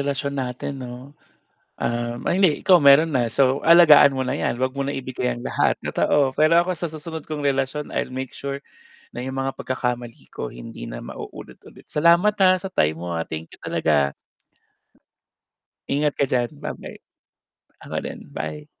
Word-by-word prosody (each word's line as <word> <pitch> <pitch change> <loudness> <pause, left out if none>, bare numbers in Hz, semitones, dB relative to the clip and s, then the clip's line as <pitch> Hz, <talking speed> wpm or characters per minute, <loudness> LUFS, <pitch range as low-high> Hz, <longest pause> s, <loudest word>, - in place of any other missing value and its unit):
relasyon 140 0 -2
natin 130 +2 -5
'no, 125 +2 -9 0.7
um, 120 0 -2
ay - - +2
hindi 185 -5 +3
ikaw 185 - +5
meron 140 +3 +7
na, 120 -3 +1
so 135 +2 +2
alagaan 165 -4 +8
mo 135 - -4
na 130 - -1
'yan 120 - -2
'wag 130 +1 -1
mo 140 - -1
na 140 - -2
ibigay 130 -2 -3
ang 120 - -5
lahat, - - +1
totoo. 135 -3 +1
Pero 155 +2 +5
ako 180 +1 0
sa 170 -1 -4
susunod 160 0 -7
kong 155 -1 -5
relasyon, 140 +1 -1
I'll - - -2
make 130 0 -6
sure 140 0 -5 0.5
na 125 +1 -6
yung 130 - -4
mga 135 0 -4
pagkakamali 125 -2 -4
ko - - -5
hindi - - -9
na - - -7
maulit-ulit. - - -11
Salamat 170 +7 +4
ha, 185 -1 +6
sa 195 - -5
time 80 - +1
mo, 85 +2 -6
ah, 80 - -3
thank 80 +1 -7
you - - -15
talaga. 70 -3 +1 1.8
Ingat 145 +1 +1
ka - - +5
diyan, 120 -2 0
ba-bye. - - -7 0.8
Ako - - -3
din, - - -8
bye. 75 0 -5
135 Hz, 170 wpm, -23 LUFS, 120-150 Hz, 1.8 s, alagaan